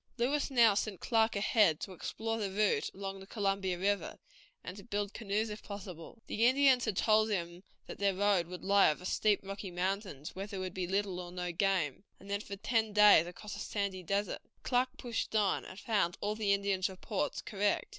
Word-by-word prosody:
Lewis 275 +5 +1
now 235 -5 +5
sent 200 -1 -2
Clark 225 -1 +2
ahead 200 -5 +3
to 195 - -6
explore 225 +5 -3
the 205 -2 -1
route 205 +1 +1
along 195 0 -5
the 190 - -12
Columbia 195 -4 -1
River, 200 +2 -1 0.5
and 180 - -7
to 200 - -11
build 205 -2 -3
canoes 215 0 -1
if 210 - -7
possible. 200 0 -9
The 230 +2 +2
Indians 260 -1 +4
had 215 -5 -2
told 215 0 +4
him 175 -3 -3 0.2
that - - -9
their 200 -1 +2
road 195 -3 +2
would 180 0 -8
lie 200 -1 +5
over 155 +4 -3
steep, 210 +2 +2
rocky 195 0 -6
mountains, 180 -4 -3
where 195 +2 -5
there 200 -2 -6
would 185 -1 -4
be 185 -2 -3
little 195 -1 -1
or 175 -1 -7
no 180 0 -3
game, 180 -4 0 0.2
and 200 +1 -11
then 200 0 -1
for 200 - -7
ten 220 +1 0
days 210 -5 +7
across 205 +4 -8
a - - -8
sandy 200 -3 -3
desert. 200 +3 -2 0.2
Clark 250 0 +2
pushed 235 -3 -3
on, 205 -3 +2
and 185 - -10
found 205 -6 0
all 205 +1 -1
the 215 -2 0
Indians' 200 -1 +1
reports 190 +2 -3
correct. 205 -1 0
200 Hz, 200 wpm, -32 LUFS, 185-215 Hz, 0.5 s, days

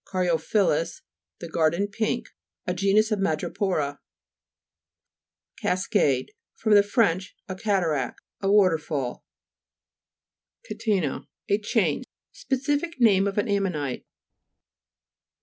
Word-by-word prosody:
caryo' 180 -4 0
phyllus, 165 -4 0 0.4
the 170 - -5
garden 165 +4 +1
pink. 220 +3 -2 0.4
A 180 - -1
genus 200 +4 +2
of 210 - +1
Ma'drepo'ra 155 -3 -1 1.6
(p. - - -4
141). 180 - +2 0.5
CAS'CADE - - -24 0.3
fr. 210 -2 +5
fr. 205 +4 +1 0.5
A 185 - -4
cataract; 180 - 0 0.2
a 195 0 +1
water 185 -6 +5
fall. 140 -5 -4 1.4
CATE'NA 195 - -1
Lat. - - -22 0.2
A 200 +1 +3
chain. 210 - +1 0.3
Specific 290 -3 -2
name 200 -5 +5
of 195 - -3
an 205 - +1
ammonite 180 -10 -1
(p. - - -42
195 Hz, 115 wpm, -25 LUFS, 165-215 Hz, 1.6 s, fr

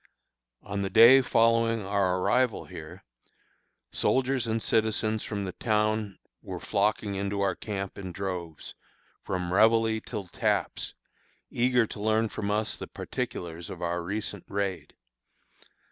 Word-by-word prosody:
On 100 0 -3
the 95 - -1
day 115 +5 +8
following 115 -3 +2
our 95 -2 +1
arrival 125 +5 +1
here, 85 +4 -10 0.9
soldiers 130 -2 +1
and 110 0 0
citizens 110 -1 +1
from 100 -2 -3
the 95 - -4
town 105 -1 0 0.2
were - - -6
flocking 105 0 0
into 100 +1 -2
our 100 -1 +2
camp 100 -3 -5
in 95 -2 -6
droves, 90 -4 -5 0.5
from 90 -2 -3
réveille 110 +1 +4
till 105 -4 -5
taps, 90 - -2 0.6
eager 125 -1 +3
to 105 - -8
learn 110 +1 +2
from 100 -1 -4
us 105 +1 0
the - - -7
particulars 85 -1 -5
of - - -7
our 85 0 -1
recent 100 +1 -4
raid. 100 -2 -3
105 Hz, 130 wpm, -28 LUFS, 95-110 Hz, 0.9 s, day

